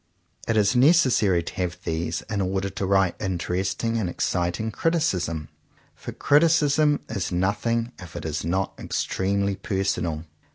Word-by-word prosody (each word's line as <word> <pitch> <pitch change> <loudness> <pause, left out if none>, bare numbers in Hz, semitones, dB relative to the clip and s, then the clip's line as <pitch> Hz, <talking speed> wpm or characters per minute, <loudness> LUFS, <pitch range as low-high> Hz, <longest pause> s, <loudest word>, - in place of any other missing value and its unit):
It 115 - +1
is 105 +2 +3
necessary 125 - +4
to - - -7
have 90 -1 -2
these 80 +1 -2
in 105 -2 -3
order 95 +1 -1
to 95 - -3
write 95 -2 +2
interesting 95 +5 -1
and 95 -5 -1
exciting 90 +5 -1
criticism; 90 - 0 0.4
for - - -8
criticism 150 -1 +3
is 100 -5 -3
nothing 110 +6 0
if 85 -4 -11
it - - -6
is 80 -1 -2
not 95 +4 -1
extremely 100 +1 -1
personal. 95 -5 -2
95 Hz, 135 wpm, -25 LUFS, 90-115 Hz, 0.4 s, necessary